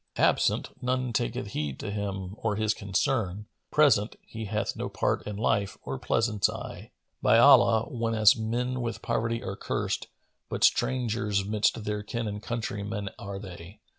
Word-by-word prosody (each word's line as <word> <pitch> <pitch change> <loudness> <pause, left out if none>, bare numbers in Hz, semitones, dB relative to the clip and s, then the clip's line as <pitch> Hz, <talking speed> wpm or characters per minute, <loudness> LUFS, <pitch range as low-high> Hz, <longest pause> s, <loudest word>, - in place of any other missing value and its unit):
Absent, - - +2
none 125 -1 -1
taketh 120 -1 -2
heed 75 -6 -3
to 105 - -4
him 100 -2 -4
or 110 -2 0
his 110 0 +1
concerns; 100 0 -1 0.2
Present, 125 -8 +4
he 110 0 -6
hath 105 +1 -2
no - - -4
part - - 0
in 105 - -4
life 100 -2 0
or 65 -1 -4
pleasance 110 -4 +1
aye. - - -7 0.3
By - - +5
Allah, 110 -1 +7
whenas 115 0 +4
men 125 +3 -2
with 115 -1 -4
poverty 115 0 -1
are 95 - -4
cursed, - - -2 0.4
But - - -3
strangers 110 -5 +2
midst 105 +1 +1
their 105 0 -2
kin 115 +2 -3
and 105 0 -4
countrymen 105 -3 -4
are 100 0 -6
they!" 90 -1 -10
105 Hz, 155 wpm, -28 LUFS, 100-115 Hz, 0.4 s, Allah